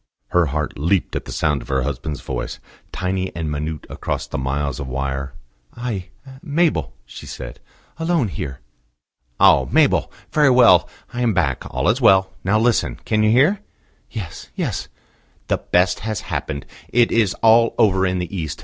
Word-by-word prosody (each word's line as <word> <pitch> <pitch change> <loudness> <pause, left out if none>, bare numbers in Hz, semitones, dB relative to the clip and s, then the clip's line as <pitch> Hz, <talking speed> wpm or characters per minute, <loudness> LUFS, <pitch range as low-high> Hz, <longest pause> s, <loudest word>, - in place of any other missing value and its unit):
Her 90 -2 +3
heart 75 0 -3
leaped 85 +5 +1
at - - -3
the - - -8
sound 75 -2 0
of - - -12
her 65 -1 0
husband's 75 +1 -4
voice, - - -4 0.3
tiny 95 0 -2
and 80 -2 -3
minute 75 +1 -4
across - - -4
the - - -4
miles 70 +1 -2
of 70 - -5
wire. 70 +1 -3 0.4
"I 115 -7 -4 0.3
Mabel," 145 - 0
she - - -11
said. 60 0 -8 0.4
"Alone 165 -8 +1
here." 65 -7 -6 0.8
"Oh! - - +6
Mabel. - - +3 0.2
Very 150 -2 +4
well. 115 -10 +6 0.2
I 120 - -3
am 115 -5 +2
back: 70 -8 0
all 65 +2 -1
is 120 +6 +2
well. 95 -4 +5
Now 100 +3 +2
listen. 120 +1 +2
Can 110 -1 +1
you 110 - +4
hear?" 145 - +4 0.5
"Yes, 95 -8 -7
yes." - - -2 0.6
"The - - +1
best 90 +1 +2
has 110 +1 -3
happened. 75 -7 -4 0.2
It 120 -1 +3
is 110 -5 +2
all 115 +1 +5
over 95 -5 +3
in 90 0 -1
the 90 +2 -4
East. 80 -4 -4
90 Hz, 165 wpm, -21 LUFS, 75-115 Hz, 0.8 s, Oh